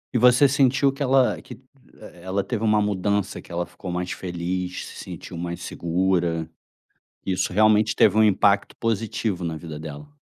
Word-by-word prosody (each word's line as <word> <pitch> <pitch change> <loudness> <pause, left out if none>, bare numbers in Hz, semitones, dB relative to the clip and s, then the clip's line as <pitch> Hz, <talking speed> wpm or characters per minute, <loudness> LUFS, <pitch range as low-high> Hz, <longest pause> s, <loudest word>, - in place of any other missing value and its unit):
E - - +5
você 125 +4 +6
sentiu 135 0 +3
que 140 - -12
ela 130 -1 +3
que - - -11 0.4
e - - -13
ela 95 +2 -2
teve 115 +2 -3
uma 105 -1 +3
mudança, 100 0 -1
que - - -16
ela 85 +1 -2
ficou 95 - -10
mais 90 0 -3
feliz, 90 0 -4
se - - -9
sentiu 85 - -8
mais 85 0 -5
segura? 85 -1 -1 0.8
Isso 95 -1 -1
realmente 110 +1 +4
teve - - +4
um 110 - +6
impacto 100 -1 +3
positivo 110 -4 -2
na 80 -1 -3
vida 80 -2 -8
dela? 75 -2 -8
95 Hz, 170 wpm, -24 LUFS, 85-110 Hz, 0.8 s, você